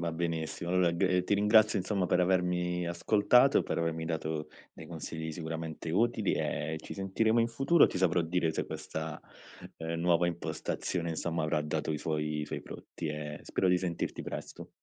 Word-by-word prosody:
Va 85 -1 -2
benissimo. 85 0 -3
Alloa 90 -2 +3
g 85 - -2
ehm, 90 -1 +2
ti - - -1
ringrazio, 105 +1 +5
insomma, 95 0 -1
per 90 +1 +2
avermi 90 -1 +1
ascoltato 110 +9 +4
e - - +2
per - - -2
avermi 80 -1 -1
dato 80 -2 -3 0.3
dei 80 - -10
consigli 80 0 -5
sicuramente 80 0 -5
utili 110 +2 +1
e 75 +2 -2
ci - - -9
sentiremo 110 +4 +1
in 115 - +2
futuro. 135 +8 +4
Ti - - -5
saprò 90 -1 +3
dire 85 0 0
se - - -2
questa, 80 -1 -5 0.6
ehm, 80 0 -3
nuova 85 0 +3
impostazione, 85 0 -3
insomma, 80 0 -2
avrà 75 -1 0
dato 75 +1 -2
i 75 - -2
suoi 75 0 -2
i - - -2
suoi - - -4
frutti. 85 - -8
E 75 -1 -5
spero 95 - 0
di 90 0 +4
sentirti 90 -2 -3
presto. - - -7
85 Hz, 180 wpm, -31 LUFS, 80-90 Hz, 0.6 s, ringrazio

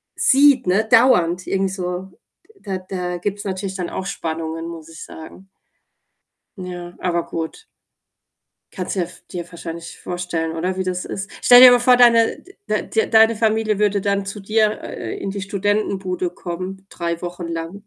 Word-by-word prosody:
sieht, 275 -4 +4
ne, 195 +5 +2
dauernd 185 -8 +4
irgendwie 195 0 0
so, 180 0 -4 0.5
da 195 -3 -3
da 180 -1 -4
gibt's 205 +3 -4
natürlich 190 0 -4
dann 180 -2 -3
auch 190 - -5
Spannungen, 165 -3 -4
muss 165 -2 -9
ich 160 - -10
sagen. 170 +4 -12 1.1
Ja, 180 -1 -7
aber 170 -2 -1
gut. 165 - -6 1.1
Kannst 185 0 -4
du 190 - -1
dir 175 - 0 0.3
ja - - -4
dir 170 - -20
wahrscheinlich 170 -1 -8
vorstellen, 170 -2 -3
oder, 185 +3 -2
wie 190 - -1
das 180 -1 -3
ist? 195 0 -5
Stell 245 0 +8
dir 255 - +12
aber 245 0 +5
vor, 245 +1 +5
deine 230 -2 +5 0.3
d - - 0
d 445 - 0
deine 225 0 +5
Familie 215 -1 +1
würde 205 -1 +2
dann 200 0 -1
zu 200 +2 -6
dir, 215 +1 +1
äh, 110 - -6
in 195 - -4
die 200 0 -5
Studentenbude 195 -2 -1
kommen, 185 +2 -7
3 170 -1 -3
Wochen 175 0 -6
lang. 165 +4 -6
190 Hz, 170 wpm, -20 LUFS, 175-205 Hz, 1.1 s, dir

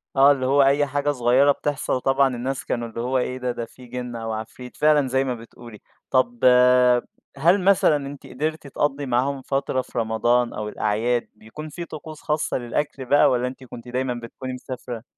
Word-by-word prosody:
آه، 140 +1 +7
اللي 130 -2 0
هو 140 +2 +4
أي 140 +2 +3
حاجة 145 +1 -1
صغيّرة 130 +2 +4
بتحصل 140 -2 -2
طبعًا 135 -1 +2
الناس 130 +3 -4
كانوا 120 -1 -2
اللي 115 0 -6
هو 130 +2 0
إيه 125 0 -2
ده! 125 -1 -2
ده 120 -1 -5
في 125 +2 -16
جن 125 0 -6
أوعفريت. 115 +2 -6
فعلًا 150 -2 +4
زي 130 +1 +1
ما 130 -2 -2
بتقولي، 115 -1 -13 0.3
طَب 120 -2 +1 0.9
هل 175 +8 +4
مثلًا 190 -5 +4
أنتِ 140 0 -10
قدرتِ 155 -1 -4
تقضّي 145 0 -1
معاهم 135 +2 0
فترة 135 -1 -1
في 125 - -11
رمضان 120 +2 +1
أو 105 0 -4
الأعياد 115 +4 -1
بيكون 130 +9 -10
في 170 +3 -7
طقوس 155 -2 -9
خاصة 150 0 -1
للأكل 130 +2 -3
بقى 145 +3 +5
والّا 125 0 +1
أنتِ 130 +1 -8
كنتِ 120 -1 -11
دايمًا 125 +1 -2
بتكوني 120 +2 -7
مسافرة؟ 125 -2 -7
130 Hz, 180 wpm, -23 LUFS, 120-140 Hz, 0.9 s, آه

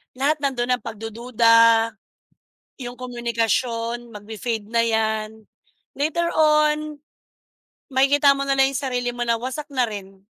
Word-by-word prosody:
lahat 285 +4 +1
nandun, 250 -2 0
ang 245 - -14
pagdududa 230 0 +3 0.9
yung 245 0 -6
komunikasyon 235 -1 -2
magpi-fade 215 +1 -5
na 230 -1 +2
yan. 220 -1 -1 0.6
Later 335 +4 0
on, 305 -1 +2 0.9
makikita 280 +2 +4
mo 275 - -2
na 275 - +3
lang 270 0 +5
'yong 260 - -2
sarili 245 -3 -2
mo 240 0 -5
na 230 -1 +1
wasak 260 +4 -5
na 255 -2 +2
rin. 195 -2 -9
240 Hz, 125 wpm, -22 LUFS, 225-275 Hz, 0.9 s, lang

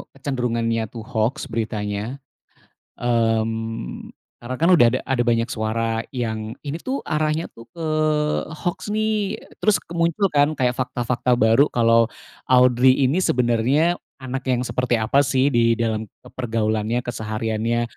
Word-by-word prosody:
kecenderungannya 115 -4 -1
tuh 115 -3 -8
hoax 110 +2 -1
beritanya, 110 +2 -3 0.8
mmm, 115 - -1 0.3
karena 125 +2 -5
kan 170 - +4
udah 135 -8 +6
ada 130 - +1
ada 130 -2 0
banyak 115 -1 +2
suara 115 0 -1
yang 110 -3 -3
ini 145 +3 -3
tuh 265 +2 -3
arahnya 155 +1 -1
tuh 115 0 -13
ke 165 -1 -5 0.8
hoax 175 +4 -2
nih. 215 -2 0 0.2
Terus 215 -3 +4
kemuncul 170 +3 0
kan 145 +2 +3
kayak 125 -1 +2
fakta-fakta 125 -1 -1
baru 115 +6 +4
kalau 115 -1 +3 0.4
Audrey 125 0 +5
ini 160 +9 +1
sebenarnya 125 +6 +2 0.2
anak 130 0 -6
yang 125 -1 +1
seperti 120 0 0
apa 110 +5 +2
sih 140 0 +2
di 115 -1 +3
dalam, 110 -2 -2
eee, - - -19
pergaulannya, 110 -1 -1
kesehariannya. 110 0 -2
120 Hz, 135 wpm, -22 LUFS, 115-135 Hz, 0.8 s, udah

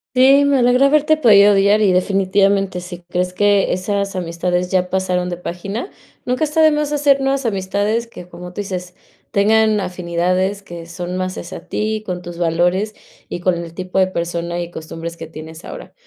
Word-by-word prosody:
Sí, 275 +3 +6
me 280 -1 +3
alegra 250 +3 +4
haberte 300 +2 +3
podido 205 -6 +6
ayudar 200 +2 +4
y, 195 -3 +4
definitivamente, 195 0 +1
si 180 0 -9
crees 180 +1 -2
que 205 0 +3
esas 200 +1 -2
amistades 180 +1 -2
ya 185 -1 +1
pasaron 180 -1 -1
de 175 - -3
página, 195 - -5 0.3
nunca 255 +5 0
está 310 +1 +1
de 315 - +7
más 300 -1 -1
hacer 285 -2 +3
nuevas 270 0 0
amistades 205 +2 -1
que, 205 -6 -11
como 180 0 -10
tú 205 - -3
dices, 180 -2 -6 0.4
tengan 215 +1 +3
afinidades 180 +2 -1
que 175 -3 -9
son 175 +1 -5
más 185 0 -3
hacia 175 - -8
ti, 215 0 -2
con 180 -1 -4
tus 175 -1 -8
valores, 175 +5 +1 0.3
y - - -5
con 180 +1 +2
el 170 -1 -7
tipo 185 +1 -3
de 190 - +5
persona 170 -1 -3
y 175 0 -5
costumbres 165 +1 -7
que 165 - -7
tienes 160 +1 -10
ahora. - - -9
185 Hz, 185 wpm, -18 LUFS, 175-215 Hz, 0.4 s, de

